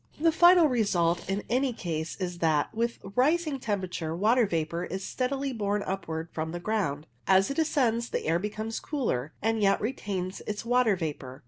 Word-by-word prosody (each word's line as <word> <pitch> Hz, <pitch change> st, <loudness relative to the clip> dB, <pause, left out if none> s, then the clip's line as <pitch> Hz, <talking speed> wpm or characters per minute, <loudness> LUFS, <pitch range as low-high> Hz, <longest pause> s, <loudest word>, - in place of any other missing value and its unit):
The 330 Hz, +1 st, +4 dB
final 345 Hz, 0 st, +7 dB
result 180 Hz, -, +1 dB
in 195 Hz, +2 st, -1 dB
any 255 Hz, +2 st, +1 dB
case 165 Hz, -6 st, -4 dB
is 180 Hz, -2 st, -4 dB
that, 155 Hz, -3 st, +1 dB
with 235 Hz, +1 st, -1 dB, 0.2 s
rising 300 Hz, +2 st, +2 dB
temperature, 185 Hz, -7 st, -3 dB
water 220 Hz, +5 st, +3 dB
vapour 170 Hz, 0 st, -2 dB
is 190 Hz, +2 st, -5 dB
steadily 270 Hz, +1 st, -2 dB
borne 205 Hz, -2 st, -1 dB
upwards 165 Hz, -4 st, -4 dB
from 160 Hz, +1 st, -3 dB
the 175 Hz, -, -3 dB
ground. 175 Hz, -7 st, -1 dB, 0.2 s
As 190 Hz, +5 st, +4 dB
it 275 Hz, -, -2 dB
ascends 245 Hz, -7 st, +1 dB
the -, -, -3 dB
air 165 Hz, +2 st, +2 dB
becomes 215 Hz, +3 st, -4 dB
cooler, 160 Hz, -, -2 dB
and 225 Hz, 0 st, +1 dB
yet 195 Hz, -1 st, +3 dB
retains 200 Hz, -5 st, -3 dB
its 210 Hz, +1 st, -4 dB
water 245 Hz, -3 st, +3 dB
vapour. 145 Hz, -6 st, -5 dB
205 Hz, 175 wpm, -28 LUFS, 170-245 Hz, 0.2 s, final